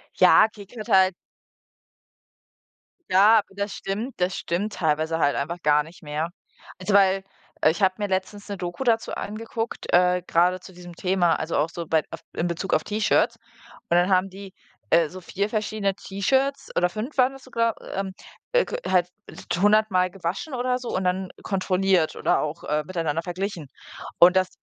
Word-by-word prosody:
Ja, - - +6
KIK 205 0 -14
hört 215 - -7
halt 190 0 +5 2.0
Ja, 210 +4 +6
das 200 +1 -4
stimmt 215 +7 -5
das 180 +1 0
stimmt 200 +6 -2
teilweise 160 0 0
halt 145 -3 +2
einfach 170 +5 -3
gar 150 0 +4
nicht 165 +2 -15
mehr. 150 +2 -3 0.5
Also, 185 +2 -2
weil, 195 -1 +4 0.4
äh, 155 - +5
ich 175 - -6
habe 190 -1 +3
mir 205 - -1
letztens 190 +2 -3
'ne 200 - -4
Doku 175 +6 -4
dazu 230 -3 +1
angeguckt, 225 +2 -5
äh, 180 0 +4
grade 180 +2 +3
zu 185 +1 -14
diesem 175 0 -11
Thema, 180 -1 +1
also 160 +1 -3
auch 150 +3 +1
so 170 0 -6
bei 160 -1 +2
auf 165 - -7
in 170 - -1
Bezug 175 +2 -3
auf - - +3
T-Shirts. 210 +1 +1 0.5
Und 170 - +3
dann 175 +2 +3
haben 185 0 +3
die, 195 0 -11 0.4
äh, 165 0 +4
so 185 +4 -10
4 200 +3 -2
verschiedene 210 -2 -1
T-Shirts 265 +10 -1
oder 180 - +2
5 220 +10 -6
waren 255 0 +4
das 270 -1 -13
sogar, 230 -3 0 0.2
ähm, 195 0 -2 0.4
äh - - +3 0.2
halt 180 -2 +2 0.5
100 210 +4 +4
mal 185 -1 +2
gewaschen 190 - -4
oder 250 0 0
so 250 -1 -7
und 185 - -1
dann 185 +1 -1
kontrolliert 185 -3 +1
oder - - +2
auch, 155 +2 -5
äh, 150 0 0
miteinander 165 -3 -2
verglichen. 180 -3 -4 0.5
Und 180 +2 +7
das 185 -1 +2
190 Hz, 175 wpm, -24 LUFS, 175-210 Hz, 2.0 s, Und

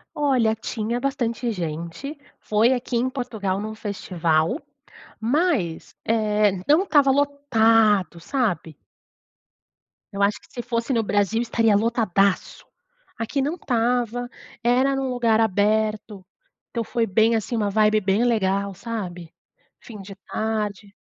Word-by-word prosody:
Olha 255 -7 +2
tinha 225 +2 -3
bastante 245 -3 -1
gente, 170 - -5 0.2
foi 220 +4 +2
aqui 245 -1 -2
em 255 +2 +1
Portugal 220 -7 -3
num 215 +1 -5
festival, 180 - -1 0.6
mas, 235 - 0
eh, 215 -2 +2 0.2
não 310 +6 +5
estava 290 -7 +4
lotado, 225 - +2
sabe? 175 - -2 1.3
Eu 200 0 -4
acho 200 +1 +2
que - - -22
se 240 - -5
fosse 235 +2 -2
no 225 -1 +1
Brasil 205 +2 +1
estaria 225 -3 +2
lotadasso! 205 -3 +1 0.5
Aqui 250 +5 -2
não 300 +5 -1
estava, 245 -3 -1 0.3
era 260 +3 +3
num 270 -1 -2
lugar 230 -3 +2
aberto 210 -1 0 0.5
então, 230 -1 -2
foi 230 +1 -1
bem 220 +3 +3
assim, 225 +2 -2
uma 210 -2 0
vibe 215 +1 +3
bem 195 +4 +1
legal, 200 -3 +1
sabe? 180 -6 -6 0.5
Fim 215 -4 -11
de 195 0 -10
tarde. 210 -2 -3
220 Hz, 125 wpm, -23 LUFS, 200-245 Hz, 1.3 s, não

